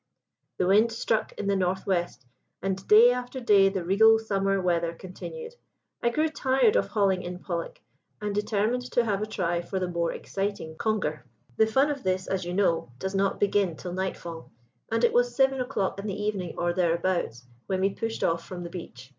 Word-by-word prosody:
"The 180 - +1
wind 210 +5 +4
stuck 225 -1 -1
in 205 - -5
the 200 0 +2
north 190 0 0
west, 175 -9 -1 0.3
and 195 0 -3
day 225 +3 +8
after 250 +1 -4
day 200 -5 +5
the 195 -2 -3
regal 220 +5 +6
summer 195 -3 0
weather 170 -2 0
continued. 465 - -8 0.5
I 235 - +2
grew 305 +6 +1
tired 265 -6 +2
of - - +2
hauling 195 -4 +1
in 180 0 -6
pollack, 170 -2 -5 0.4
and 210 -1 -3
determined 210 +3 0
to 240 - +3
have 205 -2 0
a 215 - -2
try 175 -5 -1
for 180 +2 -5
the 185 -1 -1
more 170 -1 -1
exciting 195 -5 -4
conger. 160 - -1 0.3
The 220 - +5
fun 270 +6 +3
of 280 -2 -4
this, 185 0 -1
as 190 -2 -2
you 175 +1 -3
know, 170 -10 +1
does 190 +8 -4
not 195 0 0
begin 200 -4 +2
till 175 +2 -7
night 190 +1 -2
fall, 165 -1 -9 0.4
and 225 +1 0
it 235 - +4
was 245 0 +2
seven 270 0 +3
o'clock 200 -7 -2
in 200 - -5
the 200 0 -4
evening, 200 -5 -2
or 175 0 0
thereabouts, 170 -7 0 0.2
when 190 -1 -1
we 195 +1 +2
pushed 225 +2 -3
off 165 0 +1
from 180 -1 -7
the 170 - -7
beach. 130 -8 -9
195 Hz, 200 wpm, -27 LUFS, 180-220 Hz, 0.5 s, day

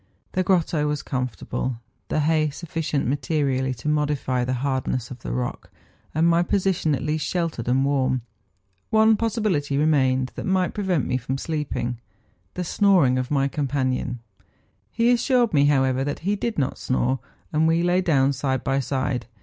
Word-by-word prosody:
The 185 - 0
grotto 170 -5 +1
was 150 -1 -2
comfortable, 125 -1 -3 0.3
the 155 - 0
hay 155 0 +2
sufficient 155 -1 -3
materially 135 0 0
to 115 +5 -7
mo¬ 150 -1 +2
dify 130 -4 -1
the 130 +1 -1
hardness 130 -2 -1
of 125 - -8
the - - -6
rock, 125 -1 -3 0.5
and 160 +2 +3
my 170 0 +4
position 175 -4 +1
at - - -5
least 150 +1 -1
sheltered 165 -10 -2
and 130 +2 +2
warm. 130 -3 +1 0.7
One 220 0 +5
possibility 205 -11 0
remained 130 -4 +2
that - - -5
might 185 -1 +1
prevent 190 -8 0
me 130 - 0
from 130 +2 -3
sleeping—the 120 - -5
snoring 175 -9 +3
of 130 0 -3
my 140 -2 +2
companion; 130 -3 -2 0.7
he 235 +1 +2
assured 245 -2 +2
me, 145 -1 +4
however, 135 -2 +2
that 145 +1 -3
he 205 +1 +2
did 230 +3 -3
not 135 -3 -1
snore, 130 0 0 0.3
and 155 +1 +3
we 165 +1 +2
lay 180 +1 +3
down 140 -6 +3
side 130 -1 -1
by 135 0 +1
side. 130 -2 -2
145 Hz, 165 wpm, -24 LUFS, 130-170 Hz, 0.7 s, One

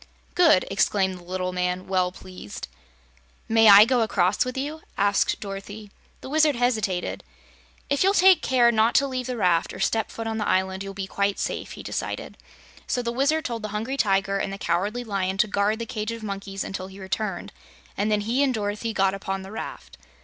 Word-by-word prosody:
"Good!" 330 - +5
exclaimed 190 -1 +1
the - - -15
little 185 +1 -3
man, 180 0 -1
well 185 -1 +1
pleased. 185 - -9 0.8
"May 225 -1 +6
I 205 +1 +10
go 250 0 +2
across 195 -3 +2
with 255 0 -5
you?" 295 +4 -4 0.2
asked 200 0 +2
Dorothy. 205 +1 -8 0.3
The - - -8
Wizard 305 -2 +4
hesitated. 215 -7 -1 0.6
"If 280 - 0
you'll 390 +2 +3
take 370 -3 +6
care 245 -2 +4
not 225 +1 +2
to 280 - +5
leave 255 -2 -3
the 250 -1 -3
raft 180 -5 +1
or - - -9
step 220 +3 0
foot 225 - -6
on 225 0 -2
the 210 - -1
island, 190 0 0
you'll 195 0 -6
be 195 -1 -3
quite 200 +1 -1
safe," - - -4
he - - -9
decided. - - -5 0.5
So 245 - -1
the 235 - -2
Wizard 285 +5 +1
told 235 -2 -3
the 215 - -4
Hungry 240 +6 -3
Tiger 195 -4 +1
and 195 - -2
the 195 - -5
Cowardly 200 +8 -1
Lion 195 -4 -2
to 215 - +3
guard 205 +1 +1
the 230 - -4
cage 215 0 -4
of 230 -1 -7
monkeys 195 -1 -5
until 190 -1 -5
he 190 +1 -12
returned, 195 0 -4 0.4
and 210 +2 0
then 210 -1 +2
he 235 +6 0
and 270 -3 +2
Dorothy 210 +2 -3
got 195 -2 +2
upon 195 -1 -4
the 190 - -10
raft. 220 - -8
205 Hz, 200 wpm, -25 LUFS, 195-235 Hz, 0.8 s, I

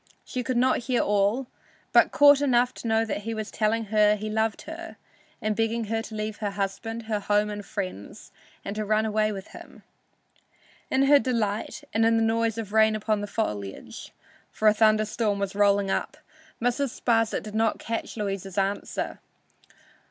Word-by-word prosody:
She 255 - -3
could 250 0 -2
not 255 +1 +3
hear 250 -2 +2
all, 205 +5 +1 0.5
but - - +5
caught 285 -1 +6
enough 250 -3 +3
to - - -7
know 225 0 +2
that 210 -1 -3
he 225 +2 -4
was 215 -1 -5
telling 220 +1 0
her 210 0 +5
he 215 +1 -5
loved 220 0 -1
her, 335 +1 -8 0.5
and 215 0 0
begging 225 +1 0
her 225 - 0
to 225 -1 -9
leave 215 0 -4
her 210 -2 -2
husband, 200 +3 -4
her 220 -1 -2
home 205 +1 +1
and 205 0 -6
friends, 185 - -6 0.3
and 200 - -4
to 215 - -2
run 215 +1 +1
away 215 0 +1
with 195 -2 -7
him. - - -13 1.1
In 265 +1 +2
her 285 +1 +6
delight 225 +2 -2
and 225 - +2
in 225 0 +4
the 225 - +2
noise 225 0 +1
of 215 -2 -5
rain 220 0 +4
upon 215 -1 -1
the 205 - -4
foliage 105 - -5 0.4
(for 215 - 0
a 210 - +7
thunder 215 0 +4
storm 210 -1 -1
was 200 -1 -2
rolling 200 -1 +3
up) 300 - -2 0.4
Mrs. 245 +2 -1
Sparsit 225 -2 +1
did 215 - -8
not 220 0 +1
catch 230 0 -5
Louisa's 195 -2 -4
answer. 195 +1 -2
215 Hz, 180 wpm, -26 LUFS, 205-230 Hz, 1.1 s, a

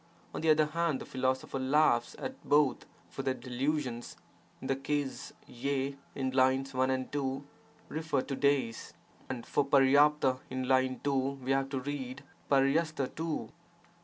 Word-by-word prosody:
On - - -4
the 160 - +2
other 155 0 +5
hand 160 -2 0
the - - -7
philosopher 130 +1 -1
laughs 130 -3 +3
at 265 - -6
both 145 -2 +2 0.2
for - - -6
their 130 - 0
delusions.' 130 -1 -3 0.4
In - - -9
this 135 0 0
case 145 -1 -2
q 135 +2 -2 0.2
in 130 -1 -1
lines 130 +1 +2
1 130 0 +2
and 130 -1 -1
2 135 -1 -2 0.4
refer 155 -3 -1
to 140 - -4
days, 135 -5 0 0.4
and 125 -3 -4
for 145 - +1
H<(N 140 -1 +4
in 130 0 -3
line 130 0 +2
2 145 - +1 0.3
we 130 - -1
have 135 0 +1
to 135 -2 -2
read 130 -2 -5 0.3
h4hi 140 +1 +2
too. 160 -1 -3
135 Hz, 155 wpm, -31 LUFS, 130-145 Hz, 0.4 s, other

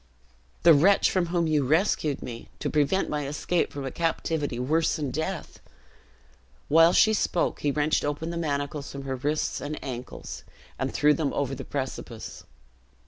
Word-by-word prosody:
"The 170 -1 +9
wretch 185 +7 +5
from 185 -2 +1
whom 170 0 +1
you 155 -3 +2
rescued 155 0 +1
me 115 -1 -8
to - - -3
prevent 155 +6 +2
my 150 -2 -2
escape 155 +4 -1
from 140 -1 -5
a 135 - -3
captivity 160 -5 -1
worse 155 +6 +1
than 145 -4 -3
death." 160 +5 -4 1.1
While 165 +3 +7
she 220 +4 +5
spoke, 180 -4 0
he 145 - 0
wrenched 150 +2 +1
open 145 +3 -2
the - - -5
manacles 145 -3 -2
from 140 0 -7
her 135 -1 -3
wrists 150 +4 -1
and 150 +1 -4
ankles, 125 -1 -7 0.4
and - - -1
threw 150 0 +4
them 150 -3 -1
over 140 -1 -1
the 135 0 -6
precipice. 130 -5 -6
150 Hz, 165 wpm, -26 LUFS, 140-165 Hz, 1.1 s, The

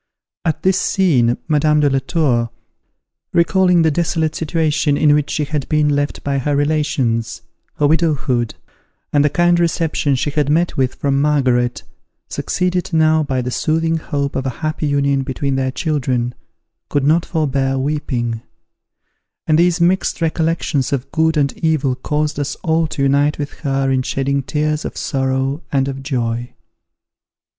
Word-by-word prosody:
At 160 -1 -1
this 190 +1 +3
scene, 130 -11 +2
Madame 150 0 +3
de 145 - +4
la 135 -1 +2
Tour, 130 -5 0 0.8
recalling 180 0 +3
the 160 - +3
desolate 160 0 0
situation 155 -2 0
in 150 -1 +4
which 150 -1 +1
she 150 - -1
had 150 -2 -3
been 150 -1 +2
left 145 0 -1
by 140 -1 0
her 145 +2 0
relations, 145 -6 0 0.3
her 145 - +1
widowhood, 145 -7 +1 0.6
and 145 -1 +4
the 150 - +3
kind 175 +2 +2
reception 165 -4 +1
she 145 +3 -1
had 145 -1 0
met 170 +4 +1
with 130 -2 0
from 140 -1 0
Margaret, 130 -5 +1 0.5
succeeded 180 0 -1
now 160 -1 +3
by 130 -4 -1
the 125 - -3
soothing 165 +4 0
hope 140 -3 -3
of 135 0 -2
a 130 +3 -6
happy 155 0 -1
union 140 -1 +1
between 135 +1 -2
their 130 0 0
children, 130 -5 -1 0.6
could 145 - 0
not 160 +4 +3
forbear 135 -5 -1
weeping; 130 -5 -2 1.0
and 155 0 +3
these 175 +1 +3
mixed 180 +3 +1
recollections 160 -4 0
of 135 -2 -3
good 160 0 +1
and 140 -2 +1
evil 155 -5 +1
caused 150 +3 -2
us 145 0 -2
all 160 -1 +1
to 140 - -3
unite 140 +2 +2
with 145 -1 -4
her 135 -2 0
in 130 -1 +2
shedding 140 +2 -1
tears 150 +2 -1
of - - -6
sorrow 135 +1 -1
and 135 -1 +1
of 135 0 -5
joy. 120 -3 -3
145 Hz, 155 wpm, -18 LUFS, 135-160 Hz, 1.0 s, de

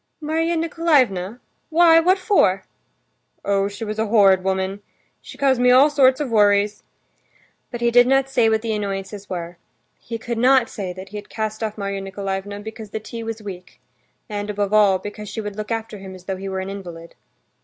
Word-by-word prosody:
"Marya 325 +2 -1
Nikolaevna? 265 - +1 0.3
Why, 330 0 +6
what 365 +4 +3
for?" 365 - +2 0.8
"Oh, 200 0 +1
she 205 +3 -6
was 215 0 -5
a 220 - 0
horrid 195 -4 +4
woman! 190 +1 -2 0.4
She - - -12
caused 265 -3 +2
me 250 - +5
all 265 +4 +6
sorts 265 -2 +4
of 285 -5 -3
worries." 205 -1 +3 0.9
But 240 -1 -7
he 235 0 +2
did 245 +1 +6
not 270 0 +3
say 245 -4 +2
what 220 0 +1
the 225 -1 -1
annoyances 200 -1 -5
were. 175 -1 -6 0.4
He 230 - -6
could 235 0 -4
not 255 0 +4
say 190 -3 -5
that 185 +1 -10
he 210 - -7
had 205 - -9
cast 215 0 -4
off 215 -1 -3
Marya 200 -1 -3
Nikolaevna 195 +1 -5
because 220 0 -9
the 220 - -4
tea 230 +2 -8
was 225 -1 -6
weak, 180 -3 -9 0.5
and, 205 0 -4
above 205 0 -2
all, 205 -3 +5
because 205 +2 -8
she - - -6
would 210 -2 -5
look 215 0 -6
after 225 -2 -4
him, 190 -1 -9
as 185 - -13
though 190 -1 -3
he 195 +1 -6
were 190 0 -3
an 190 - -5
invalid. 175 -4 -9
210 Hz, 195 wpm, -21 LUFS, 195-245 Hz, 0.9 s, Why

